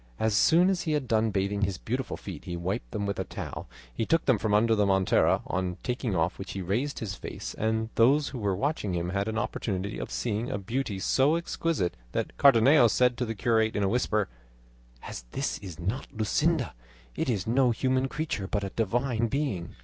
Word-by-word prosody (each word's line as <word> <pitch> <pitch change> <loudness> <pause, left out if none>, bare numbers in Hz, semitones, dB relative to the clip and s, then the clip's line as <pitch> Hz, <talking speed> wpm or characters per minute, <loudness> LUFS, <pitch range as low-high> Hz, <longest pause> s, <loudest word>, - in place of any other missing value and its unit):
As 110 -1 +1
soon 175 - +5
as 180 -2 -1
he 155 - -1
had 145 -4 -1
done 110 -1 +2
bathing 100 0 -1
his 100 -3 0
beautiful - - -3
feet, - - -8
he 90 -1 -4
wiped 85 -8 -3
them 100 +8 -3
with 100 0 -2
a - - 0
towel - - -7 0.2
he - - -1
took 165 +8 +1
from 110 - -1
under 110 +2 +4
the 105 -2 +2
montera, 95 -1 +3
on 90 -1 -2
taking 125 -4 -2
off 85 +1 0
which 95 - -6
he 95 - -4
raised 120 +11 -1
his 105 -3 -4
face, - - -6
and 110 0 -1
those 140 +6 +4
who 130 - -6
were 100 -3 0
watching 105 - -1
him 85 0 -2
had 100 +2 -1
an 110 0 -2
opportunity 100 -2 -2
of - - -5
seeing 115 0 -2
a - - -2
beauty 110 +1 -3
so 135 +9 +3
exquisite 165 - -1 0.2
that - - -2
Cardenio 135 0 +6
said 125 +2 +3
to 125 - -1
the 115 - -3
curate 110 0 +1
in 100 - +1
a - - +2
whisper: 110 -3 +1 0.8
"As - - -7
this - - -2
is 90 -4 -9
not 100 +10 -3
Luscinda, 135 +5 0 0.4
it - - -1
is 100 -7 0
no 125 +3 +3
human 130 +2 +1
creature 135 -9 -3
but 105 0 -1
a 100 - -4
divine 115 +2 0
being." 125 - -2
110 Hz, 205 wpm, -28 LUFS, 100-130 Hz, 0.8 s, Cardenio